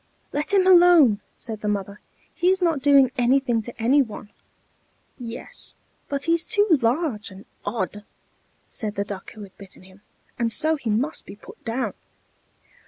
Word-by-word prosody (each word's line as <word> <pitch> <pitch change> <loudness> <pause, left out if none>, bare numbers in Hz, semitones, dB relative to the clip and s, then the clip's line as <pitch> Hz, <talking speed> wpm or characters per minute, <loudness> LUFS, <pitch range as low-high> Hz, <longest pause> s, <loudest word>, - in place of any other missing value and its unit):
"Let 295 +5 -2
him 390 -2 +4
alone," 345 - +6 0.2
said 220 -2 -6
the 210 - -3
mother: 200 0 -3 0.3
"he 355 - +1
is 380 0 +2
not 330 -6 +1
doing 275 -2 +5
anything 245 -1 +2
to 240 +2 -11
any 260 +6 +4
one." 215 -4 -7 0.9
"Yes, 240 - -7 0.3
but 280 0 -2
he's 335 0 +2
too 410 +1 +2
large 235 -2 -1
and 190 0 -13 0.2
odd," 205 -1 -3 0.6
said 215 -1 -4
the 200 - -1
Duck 200 -2 -8
who 215 - -10
had 195 -1 -14
bitten 195 -2 -12
him, 190 +1 -18 0.4
"and 230 -1 0
so 315 +5 +4
he 260 -6 -5
must 250 +9 -1
be - - -9
put - - -15
down." 230 -2 -2
240 Hz, 165 wpm, -23 LUFS, 210-305 Hz, 0.9 s, alone